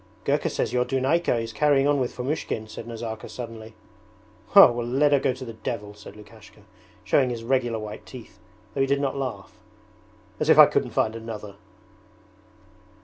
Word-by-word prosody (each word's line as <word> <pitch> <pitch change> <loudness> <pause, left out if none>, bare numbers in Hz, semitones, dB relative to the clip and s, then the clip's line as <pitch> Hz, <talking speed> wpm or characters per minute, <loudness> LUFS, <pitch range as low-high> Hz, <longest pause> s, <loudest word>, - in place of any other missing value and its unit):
'Gurka - - 0
says - - -2
your 125 0 +2
Dunayka 135 +5 +1
is 115 0 -5
carrying 140 +2 +3
on 145 -1 +2
with 125 -2 -1
Fomushkin,' 125 -4 -4
said 110 +1 -9
Nazarka 115 -1 -6
suddenly. 115 -2 -9 0.8
'Well, 120 -12 +8
let 135 +5 +2
her 140 - +4
go 130 - +1
to 130 +1 -9
the 115 - -8
devil,' 110 -2 -6
said 105 -1 -13
Lukashka, 105 -1 -16 0.4
showing 130 -3 +2
his 115 -2 -5
regular 120 -2 0
white 105 -1 -7
teeth, 120 -6 -12 0.3
though 135 - -1
he 135 - +2
did 140 +1 +1
not 140 -1 -1
laugh. 125 -8 -6 0.8
'As - - -1
if - - +6
I - - +11
couldn't - - -1
find 110 0 0
another!' 110 -3 -7
120 Hz, 170 wpm, -25 LUFS, 110-135 Hz, 0.8 s, I